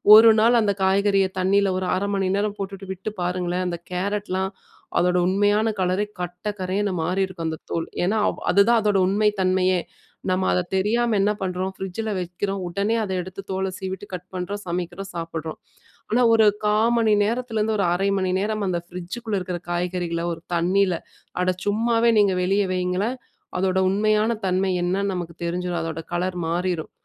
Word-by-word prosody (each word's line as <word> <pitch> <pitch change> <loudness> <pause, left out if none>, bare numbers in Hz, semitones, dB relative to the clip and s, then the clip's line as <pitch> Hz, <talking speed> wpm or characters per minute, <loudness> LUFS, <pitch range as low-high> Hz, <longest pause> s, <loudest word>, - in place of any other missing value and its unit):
1 225 +1 +9
நாள் 235 +1 +5
அந்த 200 -1 +2
காய்கறிய 195 0 +3
தண்ணில 195 +1 +3
ஒரு 185 - -2
1/2 200 +1 -1
மணி 190 -1 0
நேரம் 210 0 -1
போட்டுட்டு 195 0 -6
விட்டு 195 +3 -5
பாருங்களேன், 180 0 -1
அந்த 170 -1 -3
கேரட்லாம் 190 0 -1 0.5
அதோட 180 0 +2
உண்மையான 205 +3 +2
கலரே, 185 +2 +1 0.2
கட்ட 180 +4 -5
கரேன்னு 195 +2 0
மாறிருக்கும் 185 -1 -1
அந்த 160 - -4
தோலு, 165 -1 -2 0.2
ஏன்னா, 210 +5 +1
அவ் - - -6
அதுதான் 225 +4 +5
அதோட 205 -2 +2
உண்மை 210 +2 +3
தன்மையே! 185 0 +2 0.5
நம்ம 185 0 +1
அத - - +2 0.2
தெரியாம 225 +3 +1
என்ன 205 +1 +3
பண்றோம், 185 0 -2
ஃப்ரிட்ஜில 195 +4 -4
வைக்கிறோம். 190 +3 -3
உடனே 200 +5 0
அத 195 - -4
எடுத்து 185 +2 -8
தோல 190 0 -1
சீவிட்டு, 190 +1 -5
கட் 180 0 -6
பண்றோம், 200 +3 -4
சமைக்கிறோம், 180 +2 -4
சாப்பிடுறோம். 165 -1 -5 0.5
ஆனா 245 +3 +3
ஒரு 220 -1 +5 0.2
1/4 210 0 +3 0.2
மணி 225 -2 +3
நேரத்திலேருந்து 220 -1 0
ஒரு 195 - +1
1/2 195 +3 +1
மணி 185 -1 0
நேரம் 215 +1 -1
அந்த 175 -2 0
ஃப்ரிட்ஜுக்குள்ள 190 +5 -4
இருக்கிற 180 -1 -4
காய்கறிகள 175 -1 -2
ஒரு 165 - -6
தண்ணில 180 +2 +2 0.5
அட 185 0 +2
சும்மாவே 230 +3 +2
நீங்க 200 -2 +4
வெளிய 195 +3 +2
வையுங்களேன்! 185 +6 0 0.4
அதோட 190 0 +1
உண்மையான 215 +3 +2
தன்மை 190 +1 +1
என்னான்னு 195 +2 0
நமக்கு 170 -2 -5
தெரிஞ்சிரும். 175 0 -2
அதோட 165 0 -4
கலர் 180 +1 -1
மாறிரும். 175 -1 -1
190 Hz, 160 wpm, -23 LUFS, 180-205 Hz, 0.5 s, 1